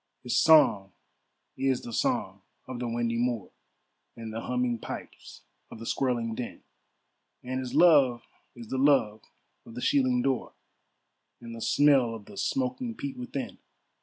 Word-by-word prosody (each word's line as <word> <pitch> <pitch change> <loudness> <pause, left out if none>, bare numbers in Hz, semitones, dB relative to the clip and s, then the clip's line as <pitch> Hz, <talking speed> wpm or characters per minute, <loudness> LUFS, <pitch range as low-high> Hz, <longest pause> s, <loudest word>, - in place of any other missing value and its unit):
His 125 - -2
song 120 - +5 0.6
is 130 -1 0
the 120 - -7
song - - -1 0.2
of 130 -2 -7
the 120 - -3
windy 115 0 -1
moor, 120 -5 -2 0.7
And 115 -1 -7
the 115 - -4
humming 125 -1 -1
pipes - - -9 0.3
of - - -10
the 115 - -9
squirling 120 -3 -1
din; 120 +1 -7 0.8
And 130 +1 -3
his 130 -1 -5
love 140 -9 +5 0.3
is 115 -2 -11
the 130 - -2
love 125 -7 +3 0.4
of 115 - -13
the - - -5
shieling 130 -3 +2
door, 135 -2 -1 0.9
And 115 -1 -9
the 115 - -8
smell 135 -3 +3
of 105 -2 -11
the 100 - -13
smoking 255 - -2
peat 275 +2 -5
within. 250 0 -6
125 Hz, 150 wpm, -28 LUFS, 115-135 Hz, 0.9 s, song